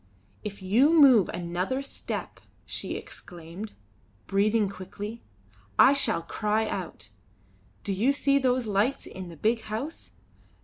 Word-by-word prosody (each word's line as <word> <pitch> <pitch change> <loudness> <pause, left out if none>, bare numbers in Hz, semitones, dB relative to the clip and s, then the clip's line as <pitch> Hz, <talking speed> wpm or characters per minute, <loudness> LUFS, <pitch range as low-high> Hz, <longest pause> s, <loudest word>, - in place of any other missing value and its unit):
"If 200 -2 -7
you 265 - +4
move 255 - +7
another 180 +10 -2
step," - - -4 0.3
she - - -4
exclaimed, 175 +5 -9 0.5
breathing 210 +2 +2
quickly, 200 +4 -7 0.6
"I 275 - +8
shall 225 -10 +1
cry 215 +3 0
out. 180 - -5 0.7
Do 200 - -1
you 225 +8 +3
see 280 0 +2
those 255 -2 +1
lights 215 +6 0
in 185 -2 -8
the 165 - -11
big 225 +6 +1
house? 225 +10 -6
215 Hz, 125 wpm, -27 LUFS, 190-255 Hz, 0.7 s, I